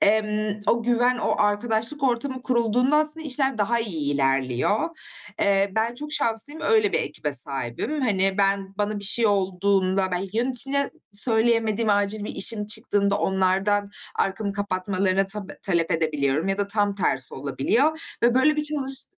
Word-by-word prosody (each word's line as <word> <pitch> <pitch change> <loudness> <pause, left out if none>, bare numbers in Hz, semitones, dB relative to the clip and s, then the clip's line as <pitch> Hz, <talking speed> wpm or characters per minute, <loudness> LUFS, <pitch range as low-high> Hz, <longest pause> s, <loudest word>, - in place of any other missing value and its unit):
emm, 215 0 +1
o 235 0 +2
güven, 245 +1 +2
o - - 0
arkadaşlık 220 +6 0
ortamı 260 +1 -1
kurulduğunda 245 +3 +2
aslında, 310 +1 0
işler 270 -2 0
daha 230 +3 +1
iyi 155 -10 -2
ilerliyor. 135 - 0 0.5
Eee, 195 -1 +2
ben 225 +2 0
çok 300 +4 -7
şanslıyım, 280 +6 0
öyle 435 -3 +3
bir - - +2
ekibe - - -4
sahibim. 305 -1 -1
Hani, 195 -5 +2
ben 195 -1 +1
bana 210 0 -1
bir 200 - -4
şey 225 +3 +2
olduğunda, 190 -1 +1
belki 190 +3 -3
yöneticine 265 +3 0 0.2
söyleyemediğim 225 0 +1
acil 205 +1 0
bir - - -6
işim 210 0 -1
çıktığında, 205 -2 0
onlardan 195 +2 +1 0.2
arkamı 200 +1 -1
kapatmalarına 195 -1 0
tap 200 0 -6
talep 170 -3 0
edebiliyorum 155 0 0
ya 195 +1 -1
da 200 - 0
tam 205 -1 +1
tersi 135 -8 0
olabiliyor 240 - -1
ve 240 +1 +4
böyle 300 +4 +3
bir 300 - +1
çalış 270 -3 -2
210 Hz, 150 wpm, -24 LUFS, 195-245 Hz, 0.5 s, ve